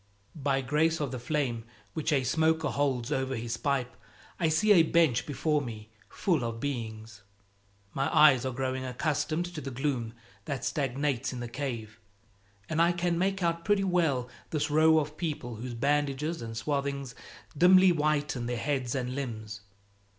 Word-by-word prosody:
By 135 -2 0
grace 155 +5 +1
of 145 -3 -2
the 130 - -4
flame 125 -3 -1 0.3
which 160 0 -1
a 135 -3 +2
smoker 160 +3 +2
holds 135 -5 -1
over 130 0 -1
his 115 0 -3
pipe 135 -4 -1 0.4
I 165 -3 +2
see 210 +7 +3
a 185 -5 +8
bench 160 -6 +2
before 150 +1 0
me, 110 -4 -8 0.2
full 165 -9 0
of 115 -1 -3
beings. 110 -5 -5 0.7
My 135 0 0
eyes 145 -5 +6
are 130 - -1
growing 130 +1 -2
accustomed 150 +5 -1
to 155 - -5
the 135 - -5
gloom 125 -3 -2 0.3
that 135 -1 -3
stagnates 135 -2 -1
in 125 - -5
the 120 - -4
cave, 115 -4 -5 0.7
and 155 +1 0
I 170 +1 +4
can 175 0 0
make 195 0 0
out 170 0 0
pretty 205 0 +2
well 165 -9 +1 0.2
this 155 -1 -1
row 160 +1 +5
of 150 0 -1
people 145 -9 -4
whose 120 +1 -6
bandages 145 +4 0
and 115 -1 -6
swathings 140 0 -2 0.4
dimly 185 +3 +7
whiten 150 -6 0
their 120 0 -2
heads 130 -2 -1
and 125 -1 -2
limbs. 110 -6 -5
140 Hz, 165 wpm, -29 LUFS, 125-155 Hz, 0.7 s, a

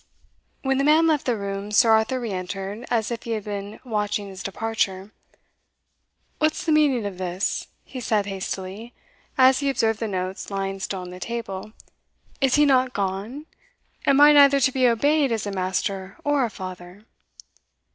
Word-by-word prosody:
When 270 0 +1
the - - +2
man 310 +3 +5
left 310 -5 +1
the 240 -3 +1
room, 200 0 -4
Sir 225 +2 +5
Arthur 220 +4 +3
re 235 -3 -4
entered, 195 +4 -5
as 230 -1 0
if 235 - -4
he 230 - -4
had 215 -2 -3
been 205 0 -6
watching 210 -3 -2
his 190 -1 -9
departure. 195 -1 -2 1.3
"What's 310 0 +1
the 325 - +1
meaning 285 -7 +3
of 195 -2 -5
this?" 185 +1 -2 0.2
he 260 - -8
said 215 -4 0
hastily, 195 +3 -6 0.4
as 260 0 +6
he 280 -1 0
observed 225 -5 +1
the 225 - -2
notes 185 -1 -4
lying 195 -1 -3
still 190 0 -4
on 180 0 -8
the 180 - -9
table 215 -2 -5 0.7
"Is 265 -2 +3
he 295 0 +5
not 260 -2 +3
gone? 200 +9 -3 0.6
Am 275 0 +5
I 295 +1 +8
neither 280 -1 +7
to 260 - +3
be 255 -1 +3
obeyed 285 +4 +2
as 220 -2 -1
a 205 - -3
master 190 +1 -3
or 290 -3 +2
a - - -3
father?" 185 0 -9
220 Hz, 175 wpm, -24 LUFS, 195-260 Hz, 1.3 s, I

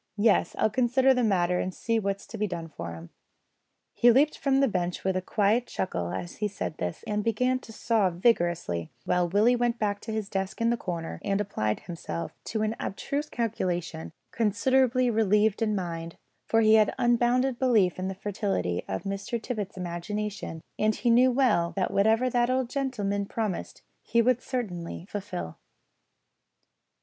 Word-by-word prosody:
Yes, 210 0 +3
I'll 220 - +2
consider 255 +3 +3
the 250 -1 +1
matter 180 -4 +2
and 185 - -1
see 230 +4 -1
what's 200 -1 -3
to 225 - -8
be 210 - +1
done 170 -3 -5
for 85 - -7
'em." 85 0 -11 0.8
He 240 - +5
leaped 285 +5 +4
from 270 -1 +1
the 275 - +4
bench 180 -5 -2
with 190 -1 0
a 185 - 0
quiet 215 +5 +1
chuckle 90 - -3
as 175 - -5
he 210 - 0
said 195 -5 -5
this 90 -1 -4
and 210 0 -1
began 250 +4 +1
to 230 - -13
saw 220 -3 +1
vigorously, 170 - +1 0.2
while 180 -1 +1
Willie 215 +7 +4
went 240 -1 0
to 210 +1 -2
his 220 -2 -2
desk 195 +1 -3
in 230 0 +2
the - - +2
corner 170 -7 -5
and 195 0 0
applied 110 - -1
himself 125 - -5
to 220 -1 -1
an 215 +1 -1
abstruse 285 +8 -3
calculation, 180 -8 -2 0.2
considerably 250 +3 +2
relieved 215 0 +2
in 215 -2 +1
mind, 165 -3 -4 0.3
for 225 - +3
he 215 0 +5
had 215 -1 +4
unbounded 240 +1 +2
belief 215 -9 +3
in 185 - -2
the 190 - -4
fertility 195 - -2
of 95 0 -3
Mr 195 +4 -3
Tippet's 215 -4 -5
imagination, 180 0 -4 0.2
and 215 0 +2
he 240 - +1
knew 250 +2 +5
well 225 -10 +2
that 190 -2 0
whatever 220 +5 +3
that 240 -1 +2
old 255 -1 0
gentleman 205 -8 -1
promised 215 -5 -4 0.2
he 235 - 0
would 250 +1 +3
certainly 180 -10 -4
fulfil. 135 - -6
210 Hz, 170 wpm, -27 LUFS, 180-235 Hz, 0.8 s, He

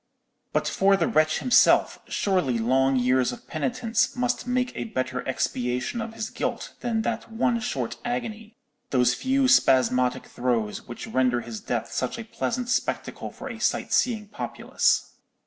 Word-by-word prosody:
"But - - 0
for 195 0 +3
the 170 - +1
wretch 155 +1 +3
himself, 250 - +4
surely 180 - +1
long 130 +4 +2
years 125 0 +2
of 120 - -10
penitence 165 - 0
must 250 0 -1
make 250 0 0
a - - -3
better 130 - -2
expiation 125 - -1
of 225 0 -6
his 220 -1 -4
guilt - - -3
than 225 -2 -1
that - - -3
one 235 +1 +1
short 130 - -3
agony—those 220 - -2
few 265 - +1
spasmodic 125 - +3
throes, 120 -4 -2
which 120 - -7
render 125 -2 +1
his 115 -3 -7
death 120 -2 -3
such 125 - -2
a 230 - -5
pleasant 235 +2 -3
spectacle 255 - -2
for - - -9
a - - -7
sight - - 0
seeing 220 -4 +1
populace. 210 - 0
155 Hz, 150 wpm, -25 LUFS, -, -, himself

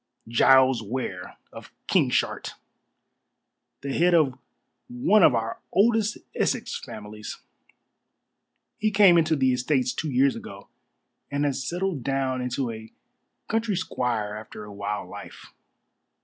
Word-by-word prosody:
"Giles 130 +1 +5
Ware, 105 -5 -5 0.2
of - - -11 0.2
Kingshart - - +1 1.3
the 140 0 -4
head 175 +3 +3
of 150 -6 +3 0.5
one 175 +13 +3
of 145 -7 +6
our 115 0 -2
oldest 220 +1 +2 0.2
Essex - - -1
families. 105 0 -8 1.4
He 215 - +2
came 200 -4 +6
into 160 -1 +3
the 130 -3 +2
estates 125 0 0
two 155 - -3
years 135 +1 +3
ago, 100 0 -10 0.6
and 140 +1 -1
has 140 -2 -1
settled 180 -4 -2
down 135 -1 -1
into 125 0 -2
a 110 0 -10 0.6
country 225 -2 0
squire 120 - -2
after 105 0 -9
a 105 -1 -10
wild 100 +1 -4
life. - - -11
130 Hz, 120 wpm, -25 LUFS, 115-165 Hz, 1.4 s, of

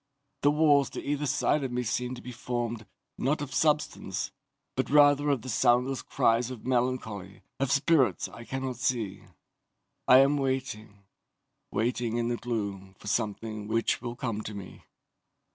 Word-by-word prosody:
The 145 - +5
walls 145 -2 +4
to - - -6
either 145 +1 -1
side 145 +1 +1
of 130 - -3
me 125 0 -1
seem 125 +2 -2
to 125 - -11
be 125 - -7
formed, 120 -2 -3 0.3
not 140 +4 +1
of 140 -2 -5
substance, 150 0 0 0.4
but - - -1
rather 145 0 +5
of 135 -6 +1
the - - -8
soundless 125 +2 +2
cries 115 +2 +1
of 125 -4 -8
melancholy 120 -6 -2 0.2
of 135 -2 0
spirits 140 -1 +3
I 115 - -11
cannot 130 0 -4
see. 115 -6 -1 0.9
"I 125 - +9
am 140 +2 +5
waiting, 130 -7 -3 0.7
waiting 115 +1 -1
in 120 0 0
the 120 - -1
gloom 100 -5 -4
for - - -17
something 110 0 -2
which 115 +1 +1
will 120 -1 -5
come 115 -4 -3
to 105 -1 -7
me. 100 -2 -10
125 Hz, 160 wpm, -28 LUFS, 110-135 Hz, 0.9 s, I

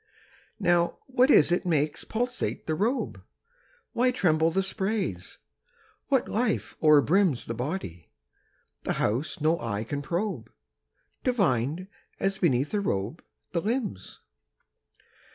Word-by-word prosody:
Now, 175 -3 +2
what 260 0 +3
is 175 - +6
it 175 - +2
makes 155 -4 0
pulsate 245 +2 -2
the 160 - -1
robe? 225 - -1 0.7
Why 250 +2 +3
tremble 160 -9 +2
the 190 +3 0
sprays? 190 - -2 0.7
What 270 -3 +2
life 225 0 -1
o'erbrims 155 0 +4
10 - - -16
The - - -1
body, 120 - -5 0.7
the - - -1
house 120 +12 -1
no 160 +2 +2
eye 110 -2 -2
can 145 +5 -4
probe, 170 - -3 0.7
Divined, 175 - +1 0.3
as 195 0 0
beneath 140 - +1
a 210 - +2
robe, 105 - -2 0.3
the 170 - +1
limbs? 215 - -3
170 Hz, 120 wpm, -27 LUFS, 140-210 Hz, 0.7 s, is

